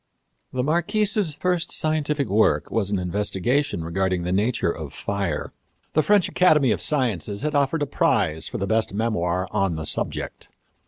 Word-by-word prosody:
The 125 -1 -1
Marquise's 195 - +1
first 180 +1 -1
scientific 150 -2 0
work 95 -8 +2
was 105 -4 0
an 100 - 0
investigation 100 - -1
regarding 90 +1 -1
the 90 - -2
nature 105 -1 +1
of 80 -5 -7
fire. 100 -7 -3 0.4
The 155 - +4
French 200 +4 +3
Academy 150 -9 +4
of - - -1
Sciences 110 - -1
had 150 0 -1
offered 145 +2 +1
a - - +1
prize 80 - 0
for - - -5
the 100 - -2
best 110 0 0
memoir 95 -5 0
on 95 -5 0
the 80 0 -4
subject. - - -3
110 Hz, 160 wpm, -23 LUFS, 95-150 Hz, 0.4 s, The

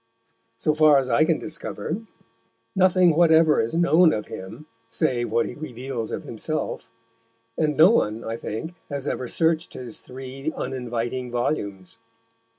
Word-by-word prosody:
So 150 +7 +1
far 155 -1 +6
as 130 -2 0
I 145 +7 +4
can 160 -1 +2
discover, 160 +1 -5 0.8
nothing 185 -3 +4
whatever 160 -2 +5
is 115 +8 -3
known 170 0 +5
of 105 - -3
him 95 +11 -9 0.2
save 120 +1 0
what 115 +1 +2
he - - -6
reveals 125 -5 -5
of - - -4
himself, 120 +2 -4 0.7
and 150 -3 0
no 165 +6 +8
one, 110 - +1
I 115 - -3
think, 115 +9 -5 0.2
has 140 -2 -4
ever 130 -3 -2
searched 165 +4 0
his 120 -3 -7
three 135 +3 -6
uninviting 125 -1 -3
volumes. 105 -6 -3
135 Hz, 145 wpm, -24 LUFS, 120-160 Hz, 0.8 s, no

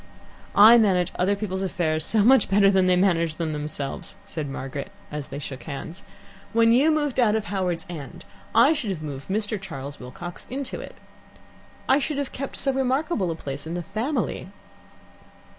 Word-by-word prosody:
"I 225 +3 +9
manage 185 -4 +2
other 195 +3 +2
people's 195 -2 -3
affairs 170 -5 -1
so 215 +4 +4
much 255 +1 +5
better 195 0 +5
than 190 -1 +3
they 180 - +4
manage 170 -4 +2
them 160 -2 -2
themselves," 150 -2 -4
said 155 -3 -5
Margaret 135 +1 -6 0.2
as 150 -2 -5
they - - -7
shook 140 -2 -7
hands. 160 +5 -7 0.5
"When 230 0 +5
you 265 +7 +5
moved 295 -4 0
out 220 -3 +4
of 220 -1 -1
Howards 185 -4 -2
End, 160 -6 -8 0.3
I - - +6
should 245 -8 -3
have 170 -5 -4
moved 140 -2 -6
Mr. 205 +1 -1
Charles 145 -6 -7
Wilcox 175 +8 -8
into 265 0 -4
it. - - -10 0.9
I 270 - +5
should 295 0 -2
have 285 -2 -2
kept 275 +1 -5
so 270 - 0
remarkable 265 - 0
a 165 - -2
place 145 -1 -6
in 165 - -4
the 175 - -3
family." 220 - -2
190 Hz, 175 wpm, -24 LUFS, 155-230 Hz, 0.9 s, I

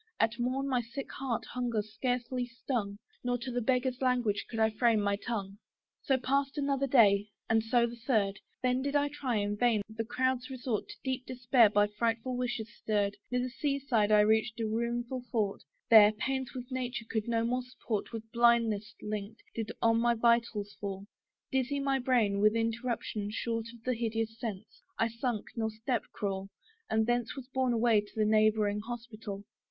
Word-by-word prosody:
At 225 +2 +1
morn 260 +3 0
my 255 -3 +1
sick 235 +4 -7
heart 260 -4 -3
hunger 240 -4 -1
scarcely 245 +3 -2
stung, 235 -4 -3 0.3
Nor 245 0 0
to 245 +1 -5
the 245 0 -1
beggar's 255 +1 0
language 245 -5 +1
could 225 - -5
I 220 0 +4
frame 225 0 +3
my 200 -1 +1
tongue. 200 -2 -4 0.4
So 270 -3 +2
passed 275 +2 0
another 275 -1 +1
day, 210 -6 +5 0.2
and 225 0 +3
so 235 +1 +3
the 235 0 -6
third: 200 -6 +2 0.2
Then 250 0 +2
did 280 +1 -2
I 290 0 +3
try, 280 -4 -2
in 205 0 0
vain, 230 -3 +3
the 220 +1 -4
crowd's 255 +2 -1
resort, 255 -4 -2
In - - -8
deep 260 -1 -2
despair 245 -2 +4
by 205 0 +4
frightful 230 +4 -1
wishes 240 -2 -3
stirr'd, 205 -2 0
Near 250 0 0
the 255 - -2
sea 280 +1 -1
side 230 -7 +1
I 210 0 +7
reached 220 +2 +2
a 225 - 0
ruined 235 +2 -1 0.2
fort: 210 -4 0 0.3
There, 215 -2 +9
pains 260 +4 -3
which 250 +1 -7
nature 250 -2 -3
could 220 -1 -2
no 230 -1 +1
more 250 +2 0
support, 245 -4 -4
With 225 -2 -5
blindness 230 -3 +3
linked, 210 +1 -5
did 225 -1 -3
on 230 0 +4
my 235 0 +3
vitals 230 -3 +1
fall; 195 -1 -4 0.5
Dizzy 265 +2 0
my 275 -1 +1
brain, 235 -6 +2
with 215 +2 +4
interruption 230 -2 -2
short 230 +1 -2 0.2
Of 255 - +2
hideous 225 -1 -2
sense; 220 -3 -6 0.2
I 230 - +2
sunk, 230 -1 -2
nor 220 -2 0
step 225 +2 -1
could - - -29
crawl, 195 -1 -3 0.4
And 220 0 +2
thence 240 0 0
was 270 -3 -7
borne 260 -2 +1
away 230 -2 +4
to 210 +1 -2
neighbouring 215 -1 +3
hospital. 220 -3 -7
230 Hz, 180 wpm, -31 LUFS, 215-250 Hz, 0.5 s, There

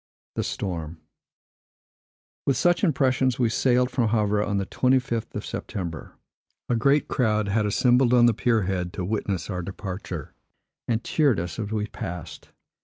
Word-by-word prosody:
With 135 - +3
such 175 +4 +2
impressions, 130 -6 +2
we 120 -3 +2
sailed 125 +2 +2
from 120 -3 +1
Havre 105 -2 +2
on 105 -1 -1
the 100 - -1
25th 125 0 0
of - - -4
September. 85 -5 -5 0.6
A 120 - +2
great 140 +5 +3
crowd 110 -5 +1
had 105 +1 +1
assembled 125 +4 +3
on 120 -1 +6
the 120 - +5
pier 115 -4 +1
head 90 -2 -2
to 90 - -3
witness 100 -2 -2
our 90 -1 -2
departure, 90 -4 -6 0.5
and 115 -1 0
cheered 145 - +2
us 85 +6 -5
as 105 -1 -3
we 105 -1 -1
passed. 90 -5 -7
110 Hz, 145 wpm, -25 LUFS, 100-125 Hz, 0.6 s, on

